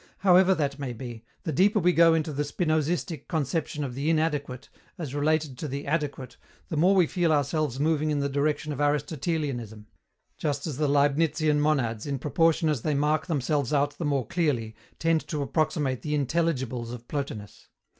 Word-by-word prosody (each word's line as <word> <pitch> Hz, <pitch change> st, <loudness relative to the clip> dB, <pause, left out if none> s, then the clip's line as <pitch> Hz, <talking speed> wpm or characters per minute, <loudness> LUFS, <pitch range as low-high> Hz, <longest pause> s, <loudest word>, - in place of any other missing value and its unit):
However 190 Hz, 0 st, +5 dB
that 140 Hz, -3 st, -2 dB
may 135 Hz, -3 st, -4 dB
be, 120 Hz, -1 st, -8 dB, 0.2 s
the 160 Hz, -, -2 dB
deeper 195 Hz, +8 st, +3 dB
we 180 Hz, -2 st, +3 dB
go 165 Hz, -1 st, +6 dB
into 155 Hz, -1 st, -1 dB
the 145 Hz, -, -1 dB
Spinozistic 155 Hz, 0 st, -1 dB
conception 155 Hz, -1 st, -2 dB
of 130 Hz, -3 st, -4 dB
the 140 Hz, +5 st, -1 dB
"inadequate," 150 Hz, -5 st, -1 dB, 0.3 s
as 150 Hz, -6 st, -5 dB
related 150 Hz, -2 st, 0 dB
to 155 Hz, -, -3 dB
the 140 Hz, +1 st, -5 dB
"adequate," 140 Hz, -5 st, -3 dB, 0.3 s
the 160 Hz, -, -3 dB
more 180 Hz, +6 st, +4 dB
we 185 Hz, -3 st, +5 dB
feel 170 Hz, 0 st, 0 dB
ourselves 145 Hz, -2 st, 0 dB
moving 155 Hz, 0 st, +1 dB
in 150 Hz, -, 0 dB
the 140 Hz, -, 0 dB
direction 145 Hz, +2 st, -1 dB
of 145 Hz, -, -4 dB
Aristotelianism 145 Hz, -, -2 dB, 0.5 s
just 145 Hz, -2 st, -2 dB
as 150 Hz, -6 st, -4 dB
the 150 Hz, 0 st, +1 dB
Leibnizian 150 Hz, +1 st, +2 dB
monads, 130 Hz, -6 st, 0 dB
in 140 Hz, -1 st, -1 dB
proportion 160 Hz, +4 st, +2 dB
as 150 Hz, -6 st, 0 dB
they 150 Hz, +2 st, 0 dB
mark 150 Hz, +4 st, +1 dB
themselves 145 Hz, -3 st, 0 dB
out 145 Hz, 0 st, +1 dB
the -, -, -2 dB
more 140 Hz, -4 st, 0 dB
clearly, 120 Hz, -9 st, -1 dB, 0.2 s
tend 165 Hz, -1 st, +1 dB
to 150 Hz, -3 st, -2 dB
approximate 145 Hz, -3 st, 0 dB
to -, -, -8 dB
the 150 Hz, -, 0 dB
Intelligibles 130 Hz, -5 st, -1 dB
of 120 Hz, -1 st, -9 dB
Plotinus. 135 Hz, -8 st, -6 dB
150 Hz, 180 wpm, -27 LUFS, 135-160 Hz, 0.5 s, go